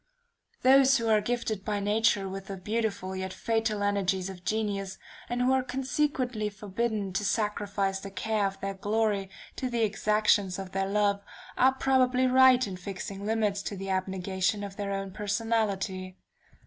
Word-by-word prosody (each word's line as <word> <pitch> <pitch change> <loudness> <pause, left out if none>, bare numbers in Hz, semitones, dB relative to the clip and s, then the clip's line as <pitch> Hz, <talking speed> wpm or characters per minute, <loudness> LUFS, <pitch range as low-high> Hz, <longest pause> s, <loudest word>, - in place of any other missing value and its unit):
Those 270 +1 +6
who 230 -1 -1
are 215 -1 +4
gifted 225 -4 -2
by 210 -1 -1
nature 205 0 +2
with 190 0 -6
the 195 - -5
beautiful, 205 -2 -2
yet 190 0 -4
fatal 220 -1 -1
energies 195 -2 0
of 180 -2 -12
genius, 200 -2 -2 0.3
and 245 +1 0
who 255 - +3
are 265 - +3
consequently 255 -3 -1
forbidden 210 -1 -3
to 195 - -1
sacrifice 205 -2 -1
the 195 - -7
care 210 +1 0
of 195 0 -7
their 195 0 -2
glory 205 0 0 0.3
to 255 - -2
the 235 -2 0
exactions 210 -3 +2
of 190 -1 -6
their 195 0 -1
love, 200 0 +1 0.3
are 260 +1 +4
probably 260 -1 +3
right 255 0 +6
in 190 -3 -6
fixing 195 +2 -6
limits 215 -3 +1
to 200 0 -5
the 195 0 -4
abnegation 190 +1 -1
of 200 -1 -6
their 200 -1 -3
own 195 -1 -3
personality. 200 -3 -1
205 Hz, 160 wpm, -28 LUFS, 195-225 Hz, 0.3 s, Those